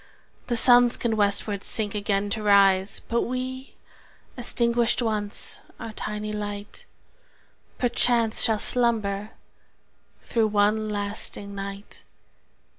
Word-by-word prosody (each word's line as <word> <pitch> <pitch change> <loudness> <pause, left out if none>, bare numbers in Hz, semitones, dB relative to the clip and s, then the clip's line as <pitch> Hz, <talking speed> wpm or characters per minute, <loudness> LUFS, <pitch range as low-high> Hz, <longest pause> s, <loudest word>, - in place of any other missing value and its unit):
The 240 - -1
Suns 245 +1 +5
can 230 -2 -1
westward 205 -1 +1
sink 210 -3 -1
again 205 -1 -1
to 215 - -2
rise 195 -1 +3
But 235 0 -1
we, 255 +1 -5 0.6
extinguished 235 -1 +1
once 210 -2 -2 0.2
our 225 -2 -7
tiny 210 0 -4
light, 205 -1 -6 0.9
5 245 -2 -1
Perforce 235 -3 +3
shall 220 -1 +2
slumber 215 -4 +1 0.9
through 225 -2 +1
one 215 +1 +1
lasting 205 0 -5
night! 200 +1 -8
215 Hz, 110 wpm, -25 LUFS, 205-235 Hz, 0.9 s, Suns